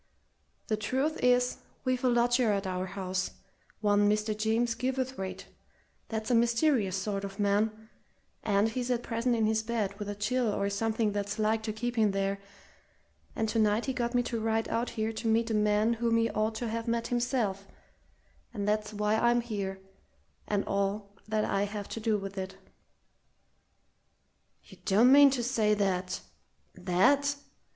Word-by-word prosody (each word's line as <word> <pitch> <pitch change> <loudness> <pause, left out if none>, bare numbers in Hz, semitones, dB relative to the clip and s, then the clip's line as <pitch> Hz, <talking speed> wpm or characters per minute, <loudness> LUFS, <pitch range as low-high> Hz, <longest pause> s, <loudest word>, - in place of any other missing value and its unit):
The 215 - -1
truth 265 +9 -1
is, 250 0 +3 0.3
we've 255 0 0
a 255 - +4
lodger 240 -1 +3
at 200 -1 -1
our 185 0 -2
house, 185 -1 -3 0.5
one 205 -1 +3
Mr. 210 +1 0
James 225 +2 +1
Gilverthwaite, 255 -5 -3 0.6
that's 220 +1 -3
a - - +4
mysterious 235 -3 +2
sort 195 +1 -2
of 195 0 -7
man, 215 +2 0 0.5
and 205 +1 +2
he's 245 +2 -3
at 240 -1 0
present 235 +1 0
in 225 -1 +2
his 220 0 +2
bed 220 -3 -2
with 205 -1 -4
a 205 - -3
chill 250 +4 0
or 200 0 -1
something 220 +1 0
that's 205 +1 -3
like 220 +1 +1
to 220 0 -3
keep 240 +3 -4
him 215 -3 +3
there; 195 0 -1 1.0
and 220 - 0
tonight 215 0 +2
he 265 - -1
got 240 -1 -2
me 245 - +3
to 235 -1 -3
ride 225 0 0
out 230 +2 -1
here 220 0 -2
to 225 - -4
meet 225 +1 +2
a - - 0
man 210 +1 +2
whom 230 0 +1
he 230 0 +1
ought 215 +1 -1
to 240 - -3
have 230 +1 -3
met 230 0 -1
himself 240 -5 -1 0.9
and 205 -1 -2
that's 210 0 -1
why 210 +1 +1
I'm 240 +2 +3
here 200 -4 -4 0.7
and 205 -1 0
all 200 +1 -1 0.2
that 215 0 0
I 200 +1 0
have 205 0 -6
to - - -5
do 220 -1 +1
with 195 0 -6
it." 190 0 -6 2.1
"You - - -16
don't 220 +6 +5
mean 285 0 +9
to 260 -3 -1
say 220 -4 +2
that 185 -2 -1 0.5
that!" 280 +11 +2
220 Hz, 170 wpm, -30 LUFS, 205-235 Hz, 2.1 s, mean